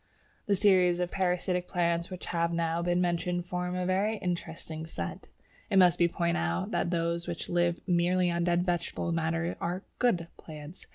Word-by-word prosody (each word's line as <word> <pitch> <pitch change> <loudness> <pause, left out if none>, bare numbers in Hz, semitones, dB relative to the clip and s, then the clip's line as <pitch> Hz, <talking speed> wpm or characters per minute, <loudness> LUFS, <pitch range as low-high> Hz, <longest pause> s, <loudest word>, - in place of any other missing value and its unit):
The 200 - +3
series 185 -3 +4
of 180 0 -1
parasitic 180 -1 0
plants 170 -2 0
which 185 -1 -7
have 170 0 0
now 165 0 0
been 175 +1 +1
mentioned 175 0 0
form 180 0 -3
a 180 0 -1
very 200 +4 +1
interesting 165 -3 -4
set. 85 - -6 0.4
It 195 - +2
must 180 -2 +6
be 170 - +5
pointed 170 0 0
out 85 +2 -1
that - - 0
those 170 0 -1
which 175 -1 -5
live 175 0 +1
merely 180 0 +2
on 170 0 0
dead 175 0 +2
vegetable 175 -1 -1
matter 165 +1 0
are 180 +3 -2 0.2
"good" 195 -9 +2
plants. 155 +2 -10
175 Hz, 175 wpm, -29 LUFS, 170-180 Hz, 0.4 s, must